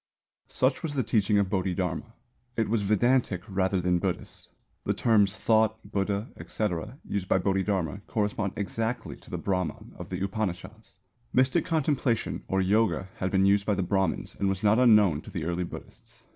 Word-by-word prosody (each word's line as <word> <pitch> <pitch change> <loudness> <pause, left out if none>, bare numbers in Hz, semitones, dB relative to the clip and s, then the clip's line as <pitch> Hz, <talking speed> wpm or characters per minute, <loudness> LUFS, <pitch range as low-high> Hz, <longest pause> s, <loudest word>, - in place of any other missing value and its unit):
Such 130 +1 +1
was 155 -3 -4
the 130 - +1
teaching 105 -2 +2
of 100 -1 +3
Bodhidharma. 95 +1 -2 0.4
It 110 -2 +1
was 115 -1 +1
Vedantic 105 -1 +2
rather 95 -1 0
than 90 0 +1
Buddhist. - - -4 0.3
The - - 0
terms 105 -3 +3
"thought," 110 -1 +3
"Buddha," 100 +2 -1
etc., 110 +4 -3
used 100 -3 -2
by - - +3
Bodhidharma 95 -2 0
correspond 105 -2 -1
exactly 110 +4 -3
to - - -18
the - - -3
brahman 90 -3 -3
of - - -7
the 95 0 -3
Upanishads. 105 +2 -5 0.4
Mystic 130 +6 +3
contemplation 145 -7 0
or 95 0 +1
yoga 95 -2 +1
had 95 - -1
been 95 0 +3
used 100 0 +3
by 105 - +2
the 95 - 0
Brahmins 95 +1 -1
and 100 - +1
was 95 +1 -2
not 105 +2 +4
unknown 105 -10 +5
to - - -12
the - - -4
early 85 +1 -1
Buddhists. 85 - -11
100 Hz, 170 wpm, -27 LUFS, 95-110 Hz, 0.4 s, unknown